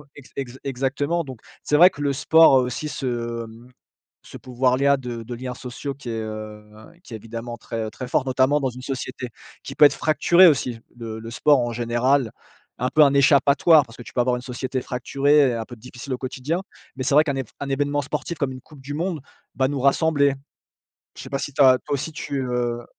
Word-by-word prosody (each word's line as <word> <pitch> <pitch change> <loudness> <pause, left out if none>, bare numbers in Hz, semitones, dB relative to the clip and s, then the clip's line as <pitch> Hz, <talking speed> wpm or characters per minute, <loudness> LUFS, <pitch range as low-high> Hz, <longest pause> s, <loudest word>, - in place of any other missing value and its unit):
exa 140 -3 -14
exa 130 -2 -6
exactement. 140 +5 -1
Donc, 130 -4 -9 0.2
c'est 150 - +2
vrai 175 +4 +8
que 145 - -10
le 145 -1 +1
sport 160 +3 +5
a - - +7
aussi 125 +4 -3
ce, 120 -4 -3
mmh, 115 +2 -14 0.5
ce - - -11
pouvoir-là 130 +2 +1
de 120 -3 -6
de 120 +2 -7
liens 125 +1 -6
sociaux 125 +3 -6
qui 130 -3 -9
est, 115 -1 -3
heu, 110 -1 -7 0.4
qui 115 - -9
évidemment 115 +2 -7
très 115 -1 -5
très 125 - -7
fort, 135 - +1
notamment 130 +2 +2
dans 135 -2 -1
une 125 +1 -10
société 130 -2 -5 0.3
qui 135 - -8
peut 150 - +7
être 145 - +5
fracturée 170 +4 +5
aussi. 125 -6 +1 0.2
Le 115 -2 -6
le 115 +1 -9
sport 145 +4 +3
en 120 -1 -1
général, 120 +2 +1 0.5
un 125 - 0
peu 155 - +3
un 140 -1 +4
échappatoire, 140 +2 +5
parce 115 -2 -15
que 120 - -9
tu - - -13
peux 125 - +2
avoir 125 0 +1
une - - -7
société 130 +1 -4
fracturée 135 +4 +1
et - - -2
heu, 115 - -3
un 110 - -4
peu 120 - -11
difficile 125 +3 -8
au - - -2
quotidien. 140 +6 -3 0.3
Mais 130 - -4
c'est 140 +2 +1
vrai 150 - +7
qu'un 145 -3 -2
évén 135 -1 -3 0.2
événement 145 +1 0
sportif 150 +4 -4
comme 140 -2 -1
une 130 - -10
coupe 145 0 -16
du 140 +2 -7
monde 165 0 -3 0.3
va 130 - +2
nous 140 -1 -3
rassembler. 140 0 +3 0.8
Je - - -8
sais - - -10
pas 135 - -2
si 145 - -5
tu 145 - 0
as 130 -1 +7
toi - - -3
aussi 140 +3 -3
tu, 140 -2 -4
heu 120 -1 -2
130 Hz, 220 wpm, -23 LUFS, 120-145 Hz, 0.8 s, vrai